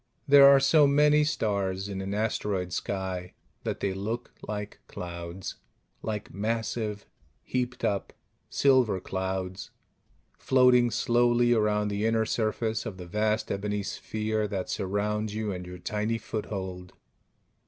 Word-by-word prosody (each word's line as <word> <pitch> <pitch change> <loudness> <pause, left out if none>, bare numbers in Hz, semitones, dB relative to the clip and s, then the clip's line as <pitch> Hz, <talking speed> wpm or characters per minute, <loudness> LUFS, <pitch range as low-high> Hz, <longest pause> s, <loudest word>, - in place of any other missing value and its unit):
There 140 -1 +9
are 140 0 +8
so 145 +2 +5
many 150 +1 +5
stars 100 -9 -1
in 95 -1 -4
an 95 +1 -4
asteroid 105 -4 -1
sky 95 -2 -3 0.3
that - - -3
they 100 - 0
look 105 +5 -4
like 105 0 -5
clouds; 85 +1 -6 0.4
like 105 -2 -4
massive, 110 0 -2 0.4
heaped 125 -1 -2
up 100 -1 -1 0.4
silver 130 -8 +3
clouds 95 0 -4 0.7
floating 125 -2 +5
slowly 120 +1 +3
around 105 -2 +2
the 105 +2 0
inner 115 0 +2
surface 110 0 -1
of 95 - -6
the 90 - -8
vast 105 +4 0
ebony 105 +1 -2
sphere 110 +1 -2
that 95 -3 -3
surrounds 105 +2 -1
you 110 -1 -2
and 90 -1 -6
your 90 0 -8
tiny 105 +5 -1
foothold. 95 -5 -5
105 Hz, 130 wpm, -28 LUFS, 95-115 Hz, 0.7 s, There